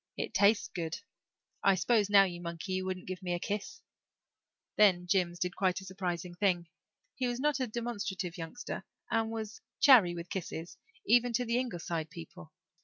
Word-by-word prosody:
It - - -3
tastes 205 +1 +4
good. 165 -2 -4 0.7
I 195 - +5
s'pose 205 +4 +2
now, 200 -1 +8
you 175 -2 -4
monkey, 170 +2 -5
you 185 0 -1
wouldn't 185 -1 -4
give 185 0 -6
me 180 -1 -1
a - - -3
kiss." 210 - -4 0.9
Then 185 -4 +5
Jims 180 -2 +1
did 180 0 -1
a - - -19
quite 185 -2 +1
surprising 180 -2 -4
thing. 175 -2 +1 0.5
He 255 - -1
was 245 0 -2
not 295 +1 +1
a 255 - 0
demonstrative 205 -6 -4
youngster 175 +8 -6 0.3
and 225 -1 +1
was 220 -1 -6 0.2
chary 225 - +7
with 170 +1 -7
kisses 170 -2 -5 0.3
even 245 +2 +4
to 245 +2 +1
the 235 +1 +1
Ingleside 170 -9 -3
people. 165 - -11
190 Hz, 175 wpm, -31 LUFS, 175-225 Hz, 0.9 s, now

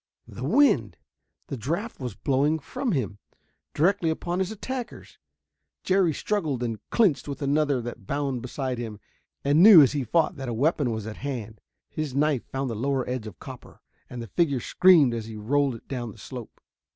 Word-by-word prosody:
The 120 - -8
wind! 275 - +3 0.5
The 135 - -5
draft 170 - -3
was 125 -6 -5
blowing 140 +7 +1
from 255 - -3
him, 105 - -2 0.6
directly 175 +1 +2
upon 175 +3 -2
his 190 -1 0
attackers. 245 +3 -7 0.6
Jerry 190 -3 +3
struggled 155 - -2
and 115 -3 -3
clinched 200 -13 +2
with 140 - -5
another 145 -2 +1
that 120 -4 -8
bounded 140 -3 -2
beside 125 0 -4
him, 110 -4 -6 0.5
and 145 +3 +4
knew 190 -6 +10
as 135 - +3
he 145 -2 -1
fought 160 +7 +1
that 135 -2 -5
a 115 - -3
weapon 145 +1 +1
was 110 -2 -3
at 110 -1 -7
hand. 120 -6 -6 0.3
His 155 -4 -4
knife 145 -3 +1
found 135 -2 -3
the - - -4
lower 135 +3 -1
edge 125 -3 -3
of 105 - -10
copper, - - -11 0.3
and 120 -1 -6
the - - -9
figure 140 - +1
screamed 165 -3 +5
as 115 -2 -4
he 110 - -8
rolled 135 +4 +1
it 115 - -14
down 120 -5 -5
the - - -18
slope. 125 -4 -9
140 Hz, 185 wpm, -26 LUFS, 120-160 Hz, 0.6 s, knew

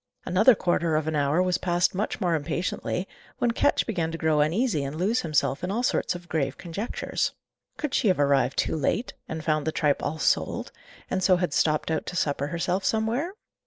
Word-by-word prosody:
Another 215 +7 +5
quarter 170 -3 +1
of 155 0 0
an 160 - -1
hour 145 +4 +2
was 180 -1 +1
passed 175 0 +1
much 200 +3 -2
more 180 -5 +1
impatiently, 170 +4 -2 0.3
when 240 - +1
Ketch - - +2
began 170 -7 -1
to 165 - -4
grow 160 -2 +2
uneasy 165 - +1
and 140 +2 -4
lose 200 +9 +1
himself 150 -2 0
in 180 - -1
all 225 +5 -1
sorts 185 - +1
of 175 0 -9
grave 140 -5 -1
conjectures. 190 +7 -3 0.4
Could 300 -4 -3
she - - +2
have 185 -5 +3
arrived 140 -1 +2
too - - +1
late, 160 - -1 0.2
and 160 0 -4
found 155 -1 +1
the - - +2
tripe 150 -2 +1
all 160 - -2
sold, - - 0 0.4
and 190 - 0
so 185 0 +5
had 175 -4 -1
stopped 155 +1 +1
out 160 - -2
to - - -5
supper 145 -4 0
herself 175 +4 -1
somewhere? 235 - 0
170 Hz, 200 wpm, -26 LUFS, 155-190 Hz, 0.4 s, Another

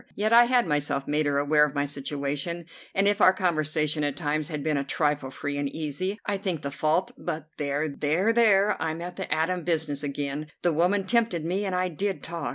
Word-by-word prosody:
Yet 215 +2 +1
I 240 +1 +8
had 245 0 +3
myself 145 -3 -1
made 150 0 +1
her 140 -1 +1
aware 150 +1 +4
of 150 -1 0
my 140 0 +1
situation, 145 +4 -3 0.3
and 195 +1 +3
if 205 +1 +2
our 185 - +8
conversation 155 -4 0
at 145 -1 -1
times 150 -1 -1
had 150 -3 -4
been 155 -1 0
a 140 - 0
trifle 145 -1 0
free 145 +1 -4
and 140 -1 -1
easy 160 +8 -3
I 205 - 0
think 185 -6 -3
the 140 - -3
fault 155 +5 +1
but 155 -3 -5
there 145 +1 -1
there 155 +9 +1
there 210 -4 +4
I'm 160 0 -2
at 175 0 -7
the 190 - -6
Adam 165 +3 0
business 155 -4 0
again. 145 +1 -3 0.2
The 175 - +2
woman 185 +5 +2
tempted 220 -7 +1
me, 190 +4 -1
and 190 -2 -1
I 185 0 0
did 195 +4 -3
talk. 165 -5 -4
155 Hz, 215 wpm, -26 LUFS, 145-185 Hz, 0.3 s, I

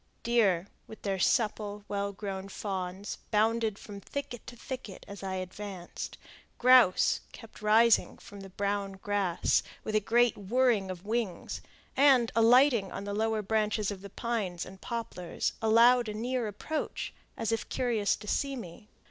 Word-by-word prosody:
Deer, 205 -7 +3 0.2
with 220 - -12
their 195 -2 -1
supple, 210 -1 0
well 200 0 -2
grown 195 -1 -6
fawns, 190 -1 -4
bounded 220 0 +2
from 200 -1 -10
thicket 280 0 -6
to 245 - -8
thicket 245 -5 -8
as 200 0 -9
I 190 -1 -3
advanced; 185 0 -6 0.4
grouse 250 -6 +5
kept 225 -3 -13
rising 220 +2 +4
from 205 - -12
the 195 0 -9
brown 200 +1 -2
grass 195 -2 +1 0.2
with 215 - -4
a 215 - +4
great 235 +2 +3
whirring 215 -1 +1
of 185 0 -7
wings, 220 -4 -2 0.3
and, 265 -4 +5
alighting 230 -2 +5
on - - -5
the 200 0 -4
lower 220 0 0
branches 215 0 0
of 195 -2 -7
the 200 - -9
pines 200 -6 -3
and 190 +1 -12
poplars, 225 -7 -3
allowed 230 +1 +5
a 210 - -5
near 245 +1 -1
approach, 255 +10 -4 0.2
as 225 - -1
if 225 - -2
curious 230 -5 +1
to 210 - -12
see 275 +5 0
me. 210 -2 -10
210 Hz, 155 wpm, -30 LUFS, 195-235 Hz, 0.4 s, grouse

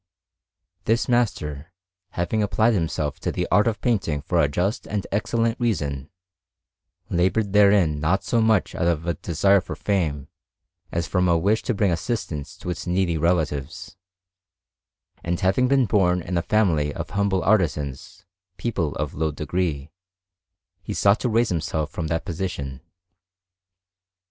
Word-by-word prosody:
This 115 +2 +1
master, 90 - -1 0.4
having 90 +5 -1
applied 110 +3 +2
himself 80 -6 -2
to - - -2
the - - -2
art 105 +4 +4
of 110 -3 -1
painting 90 - 0
for 85 +2 +1
a 75 - +3
just 95 - -2
and 105 -2 -3
excellent 115 +3 0
reason, 75 - -1 1.0
laboured 95 +4 +1
therein 100 -7 +4
not 85 +6 +1
so 115 - +1
much 110 -3 +2
out 85 - -1
of 85 -1 0
a 85 - 0
desire 95 +6 +2
for 90 - -7
fame 80 -9 -1 0.6
as 85 0 -1
from 90 0 +1
a 85 -1 +4
wish 100 +6 +1
to 125 - -2
bring 100 -2 +2
assistance 85 - -3
to - - -7
his 90 - -4
needy 90 -1 +1
relatives; 80 -4 -1 1.3
and 85 +1 -2
having 100 +7 +3
been 135 -1 +3
born 90 -5 +2
in 90 +2 -4
a 85 - +2
family 85 -8 +1
of - - -6
humble 100 -1 0
artisans, 85 -5 -1 0.3
people 90 -11 -2
of 75 -2 -3
low 80 +1 -1
degree, 75 -1 -3 0.9
he - - -5
sought 100 +2 +4
to 125 - -1
raise 115 +1 +2
himself 80 -2 -2
from 85 - -4
that 80 +1 -2
position. 80 -7 -4
90 Hz, 150 wpm, -23 LUFS, 80-105 Hz, 1.3 s, art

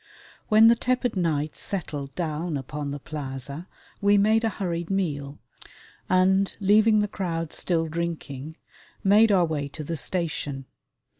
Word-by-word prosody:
When 220 +1 +7
the 230 - +8
tepid 250 -1 0
night 155 -4 -1
settled 145 -8 -3
down 160 -1 -2
upon 145 +2 -5
the 140 - -4
plaza, 140 +2 -6 0.3
we 205 0 +4
made 215 +3 +3
a 225 - +2
hurried 175 -5 -3
meal 150 -7 -2 0.7
and, 190 +1 +3
leaving 215 +2 +4
the 210 - 0
crowd 165 -5 -3
still 165 -2 0
drinking, 160 -3 -5 0.5
made 210 +3 +5
our 185 -3 +4
way 150 -3 -2
to 155 +2 -8
the 165 +3 -3
station. 145 -5 -3
170 Hz, 140 wpm, -25 LUFS, 150-200 Hz, 0.7 s, the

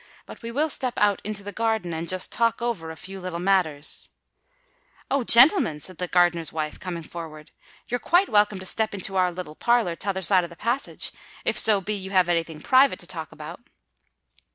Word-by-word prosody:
But - - -12
we 230 - -6
will 295 +6 0
step 255 -3 0
out 205 -2 +2
into 210 -1 -5
the 205 - -6
garden, 220 -5 -1
and 165 +1 -4
just 185 0 -1
talk 230 -1 +1
over 230 -9 -3
a 160 - -7
few 190 +5 -9
little 180 -2 -5
matters——" 175 -5 +1 1.0
"Oh! 275 -1 +1
gentlemen," 235 - +5
said 185 +4 -11
the 180 - -2
gardener's 175 -2 +2
wife, 155 -1 -4
coming 175 -3 -6
forward, 155 -2 -9 0.4
"you're 245 - -2
quite 355 +8 +3
welcome 210 -2 +2
to 190 - -8
step 215 +2 +1
into 195 0 -4
our 180 -1 +2
little 175 -3 -7
parlour 235 -2 +1
t'other 190 +1 -3
side 180 +1 +4
of 170 - -6
the 170 - -13
passage—if 240 +9 -4
so 210 -3 +4
be 210 +3 -3
you 190 -2 -6
have 185 -2 +3
any 170 -1 +3
thing 160 -2 -11
private 265 - +4
to - - -6
talk - - -6
about." - - -9
190 Hz, 200 wpm, -24 LUFS, 170-225 Hz, 1.0 s, gentlemen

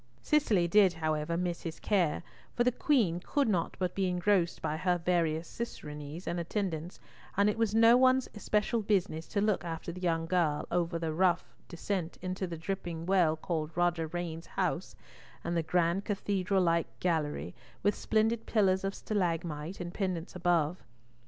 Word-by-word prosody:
Cicely 220 -13 +3
did, 190 0 +5
however, 155 0 -1
miss 175 -1 -2
his 165 -2 -6
care, 180 -7 +1 0.3
for 240 - +3
the 250 - +3
Queen 230 - +2
could 280 +9 0
not 180 -6 0
but 180 -2 -1
be 195 -1 0
engrossed 180 -1 +1
by 150 - -2
her 180 +2 +1
various 165 -2 0
cicerones 150 -7 -7
and 175 - -2
attendants, 170 -2 -3 0.4
and 200 +1 +4
it - - -5
was 220 -2 0
no 230 +1 +7
one's 260 0 +4
especial 210 +2 0
business 190 -6 0
to 205 - -1
look 205 -5 +1
after 165 0 -5
the 180 +2 -9
young 165 -2 +1
girl 165 -4 +1
over 170 -1 0
the 165 -1 -2
rough 175 +1 +1
descent 175 -1 -3 0.2
to 185 0 -3
the 170 -1 -5
dripping 165 -1 -4
well 180 -4 +3
called 155 -1 -3
Roger 175 -2 +1
Rain's 165 0 -5
House, - - -2 0.5
and 170 - -2
the 165 - +2
grand 170 +3 +1
cathedral 195 -2 0
like 170 -1 0
gallery, 150 - -1 0.3
with 205 - +3
splendid 225 +1 0
pillars 190 -4 +2
of 195 0 -2
stalagmite, 170 -4 -2
and 175 -1 -5
pendants 185 -3 -3
above. 175 -1 +1
175 Hz, 165 wpm, -31 LUFS, 165-200 Hz, 0.5 s, no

